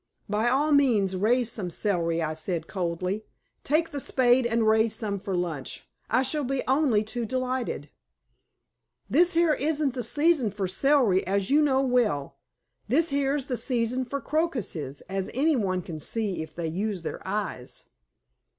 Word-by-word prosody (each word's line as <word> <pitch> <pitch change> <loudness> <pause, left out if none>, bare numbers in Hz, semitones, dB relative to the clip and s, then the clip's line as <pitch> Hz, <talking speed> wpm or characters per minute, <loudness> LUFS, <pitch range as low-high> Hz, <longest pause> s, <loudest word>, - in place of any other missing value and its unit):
"By 215 +3 +1
all 285 +5 +2
means 230 -10 +3
raise 230 +5 +2
some 195 -6 -3
celery," 170 -3 0
I 155 0 -1
said 160 +1 -3
coldly. 180 +3 -3 0.4
"Take 320 +3 +1
the 290 - -3
spade 250 -2 +3
and 230 -1 +1
raise 220 0 +3
some 205 -3 -3
for 190 -1 -3
lunch. 160 -7 -4 0.2
I 250 +4 +3
shall 295 +2 -1
be 270 0 -1
only 260 -6 +3
too 235 +3 -4
delighted." 255 - -3 1.2
"This 345 +6 +4
here 335 -1 +4
isn't 295 -2 0
the 250 - -3
season 290 +1 +2
for 200 -1 -3
celery, 230 -2 +3
as 195 +2 0
you 295 +2 +5
know 270 -3 +3
well. 210 - 0 0.5
This 310 +9 +3
here's 280 0 0
the 255 -4 -3
season 250 0 0
for 280 +3 -3
crocuses, 240 - -2
as 190 0 -4
any 300 +4 +3
one 185 -6 -1
can 160 -2 -7
see 205 +2 -2
if 160 -1 -9
they 170 - -3
use 190 +3 -2
their - - -5
eyes." 190 -10 -4
230 Hz, 160 wpm, -26 LUFS, 185-270 Hz, 1.2 s, you